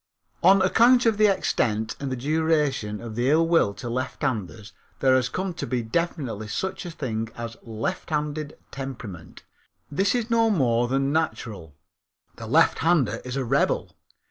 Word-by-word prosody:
On 190 Hz, +2 st, +6 dB
account 240 Hz, +6 st, +5 dB
of 220 Hz, -2 st, +2 dB
the 215 Hz, -, +6 dB
extent 110 Hz, -, 0 dB
and 140 Hz, -1 st, -4 dB
the -, -, -1 dB
duration 145 Hz, -6 st, 0 dB
of 115 Hz, -2 st, -7 dB
the 120 Hz, +4 st, 0 dB
ill 165 Hz, +3 st, +4 dB
will 165 Hz, -11 st, +3 dB
to 105 Hz, -, -7 dB
lefthanders 115 Hz, -4 st, -3 dB, 0.3 s
there 130 Hz, -1 st, +4 dB
has 125 Hz, -1 st, +1 dB
come 185 Hz, +6 st, -3 dB
to -, -, -5 dB
be 120 Hz, -1 st, -1 dB
definitely 125 Hz, -5 st, -2 dB
such 190 Hz, -, -3 dB
a -, -, -5 dB
thing 115 Hz, -9 st, -4 dB
as 115 Hz, -1 st, -5 dB
a 115 Hz, -, -17 dB
lefthanded 150 Hz, +6 st, -3 dB
temperament. 120 Hz, -11 st, -8 dB, 0.5 s
This 195 Hz, +9 st, +1 dB
is 235 Hz, -1 st, -2 dB
no 230 Hz, -1 st, +4 dB
more 120 Hz, -, +2 dB
than 135 Hz, +2 st, 0 dB
natural. 110 Hz, -, -3 dB, 0.6 s
The -, -, -7 dB
lefthander 165 Hz, -3 st, +3 dB
is 125 Hz, 0 st, -5 dB
a 135 Hz, -, -1 dB
rebel. 135 Hz, +4 st, 0 dB
135 Hz, 160 wpm, -25 LUFS, 115-165 Hz, 0.6 s, On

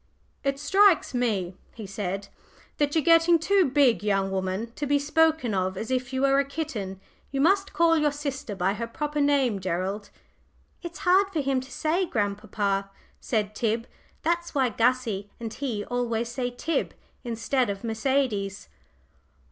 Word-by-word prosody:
"It 275 Hz, 0 st, 0 dB
strikes 385 Hz, +3 st, +4 dB
me," 210 Hz, -8 st, 0 dB, 0.2 s
he 220 Hz, -, -7 dB
said, 195 Hz, 0 st, -4 dB, 0.5 s
"that 290 Hz, 0 st, +1 dB
you're 320 Hz, -, +3 dB
getting 330 Hz, +2 st, +6 dB
too 370 Hz, 0 st, +3 dB
big, 265 Hz, -4 st, +4 dB
young 195 Hz, -2 st, 0 dB
woman, 190 Hz, +4 st, -2 dB
to 290 Hz, -, -2 dB
be 285 Hz, +1 st, +3 dB
spoken 310 Hz, -4 st, +2 dB
of 185 Hz, 0 st, -1 dB
as 220 Hz, +5 st, -4 dB
if 255 Hz, 0 st, -1 dB
you 260 Hz, 0 st, -1 dB
were 275 Hz, 0 st, +4 dB
a -, -, +3 dB
kitten. 270 Hz, -10 st, -5 dB, 0.3 s
You 275 Hz, -, -3 dB
must 390 Hz, +6 st, +3 dB
call 335 Hz, -1 st, +4 dB
your 300 Hz, -2 st, +2 dB
sister 280 Hz, -7 st, -4 dB
by 190 Hz, +1 st, +1 dB
her 230 Hz, +3 st, -4 dB
proper 295 Hz, +5 st, -2 dB
name, 275 Hz, -7 st, +2 dB
Gerald." 190 Hz, +3 st, -3 dB, 0.7 s
"It's 345 Hz, -2 st, -7 dB
hard 380 Hz, +2 st, +5 dB
for 320 Hz, -5 st, 0 dB
him 270 Hz, -1 st, 0 dB
to 260 Hz, -, -12 dB
say, 340 Hz, +7 st, 0 dB
grandpapa," 200 Hz, -3 st, -1 dB, 0.3 s
said 215 Hz, -3 st, -1 dB
Tib. 225 Hz, +1 st, -1 dB, 0.4 s
"That's 340 Hz, 0 st, -1 dB
why 265 Hz, -3 st, +3 dB
Gussie 230 Hz, -3 st, 0 dB
and 225 Hz, -2 st, -5 dB
he 230 Hz, -7 st, -3 dB
always 235 Hz, -2 st, -1 dB
say 245 Hz, +1 st, -2 dB
Tib, 275 Hz, +7 st, -2 dB, 0.3 s
instead 240 Hz, +1 st, 0 dB
of 195 Hz, +1 st, -4 dB
Mercedes." 220 Hz, -4 st, -1 dB
250 Hz, 160 wpm, -26 LUFS, 205-295 Hz, 0.7 s, getting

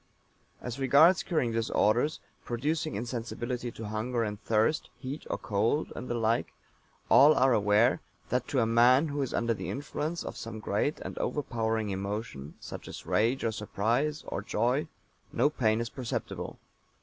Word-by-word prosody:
As 125 Hz, +1 st, -5 dB
regards 145 Hz, +8 st, +6 dB
curing 155 Hz, -9 st, 0 dB
disorders, 115 Hz, +5 st, +1 dB, 0.2 s
producing 150 Hz, +6 st, -2 dB
insensibility 120 Hz, +2 st, -4 dB
to 110 Hz, -, -7 dB
hunger 115 Hz, +3 st, -1 dB
and 105 Hz, -1 st, -4 dB
thirst, 110 Hz, +8 st, +1 dB
heat 140 Hz, +3 st, -6 dB
or -, -, -1 dB
cold, 110 Hz, +8 st, 0 dB
and 125 Hz, -, -6 dB
the 120 Hz, -, -1 dB
like, 115 Hz, 0 st, 0 dB, 0.5 s
all 145 Hz, +3 st, +7 dB
are 130 Hz, -1 st, +4 dB
aware 105 Hz, +3 st, +3 dB, 0.3 s
that 125 Hz, 0 st, 0 dB
to 130 Hz, -, +1 dB
a -, -, +3 dB
man 125 Hz, +6 st, +5 dB
who 145 Hz, 0 st, -2 dB
is 135 Hz, -, -2 dB
under 115 Hz, 0 st, +1 dB
the -, -, -5 dB
influence 150 Hz, +4 st, -3 dB
of -, -, -5 dB
some 115 Hz, -1 st, -6 dB
great 105 Hz, +8 st, -1 dB
and -, -, -6 dB
overpowering 115 Hz, -6 st, -1 dB
emotion, 95 Hz, -7 st, -5 dB
such -, -, -8 dB
as -, -, -8 dB
rage 115 Hz, +5 st, +1 dB
or 115 Hz, -, +1 dB
surprise, 115 Hz, +8 st, -1 dB
or -, -, -4 dB
joy, 120 Hz, +8 st, 0 dB, 0.4 s
no 145 Hz, -, +2 dB
pain 110 Hz, -6 st, +1 dB
is 115 Hz, 0 st, -2 dB
perceptible. 125 Hz, -4 st, -4 dB
120 Hz, 160 wpm, -29 LUFS, 110-135 Hz, 0.5 s, all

